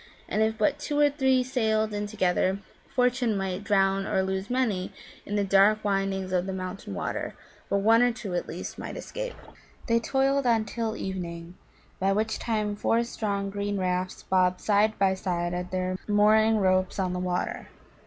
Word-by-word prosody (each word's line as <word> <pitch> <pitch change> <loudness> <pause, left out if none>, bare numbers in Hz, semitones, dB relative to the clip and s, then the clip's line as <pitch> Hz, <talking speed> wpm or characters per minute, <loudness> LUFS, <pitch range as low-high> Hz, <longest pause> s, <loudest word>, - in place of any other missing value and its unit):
And 215 - 0
if 220 0 +1
but 280 +7 +1
two 295 0 -3
or 290 -1 +5
three 265 -3 +2
sailed 220 -4 0
in 205 0 -2
together, 190 -2 +1 0.3
Fortune 250 -3 +1
might 190 0 -3
drown 195 -1 +2
or 190 - +1
lose 190 +1 -3
many 230 -8 0 0.4
in 205 - -2
the 205 - +2
dark 200 +2 +4
windings 195 -2 0
of 180 +1 +1
the 190 - -3
mountain 185 - -5
water, - - -3 0.3
but 200 0 +1
one 225 +3 +5
or 245 0 +4
two 210 -5 -6
at 175 - -2
least - - -6
might - - -6
escape. - - -5 0.5
They 230 -1 +3
toiled 270 +2 +1
on 225 -2 +3
till 225 0 -3
evening, 170 -2 -5 0.5
by 195 +1 +2
which 220 +2 -1
time 215 -3 -1
four 230 +3 +1
strong 200 -4 -3
green 205 0 -2
rafts 185 0 -2
bobbed 185 -1 +2
side 215 +1 +2
by 195 -1 +3
side 175 -2 -2
at 180 0 -3
their 185 0 -2
mooring 215 +1 +4
ropes 185 -2 +2
on 185 -2 0
the 180 - -2
water. 180 0 -2
200 Hz, 180 wpm, -27 LUFS, 185-220 Hz, 0.5 s, or